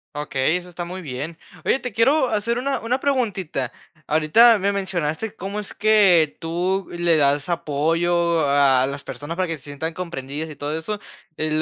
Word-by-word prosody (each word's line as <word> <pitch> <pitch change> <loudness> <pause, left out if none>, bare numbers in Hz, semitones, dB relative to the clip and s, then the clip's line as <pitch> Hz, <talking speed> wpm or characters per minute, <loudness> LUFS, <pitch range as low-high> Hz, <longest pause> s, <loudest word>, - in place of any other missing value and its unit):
Okey, 145 +2 0
eso 180 0 -9
está 175 0 -6
muy 180 +2 -6
bien. 150 +2 -6 0.3
Oye, - - +2
te 250 -4 -6
quiero 260 +6 +3
hacer 230 +1 -1
una, 270 +2 -1
una 245 +3 0
preguntita. 200 - -1 0.4
Ahorita 185 +10 +5
me 200 +1 +1
mencionaste 190 +1 -2
cómo 195 +3 -5
es 205 - -10
que 195 -7 +4
tú 180 +4 -1
le 175 -1 +2
das 145 -1 +2
apoyo 170 +1 +1
a 140 -2 +4
a 130 - +1
las 140 0 -6
personas 160 +4 -6
para 185 - 0
que 165 -1 -3
se 140 - -19
sientan 145 +3 -5
comprendidas 160 -3 -5
y 155 - -9
todo 150 +2 -3
eso, 205 +6 -4 0.4
el 155 0 0
170 Hz, 180 wpm, -22 LUFS, 150-200 Hz, 0.4 s, Ahorita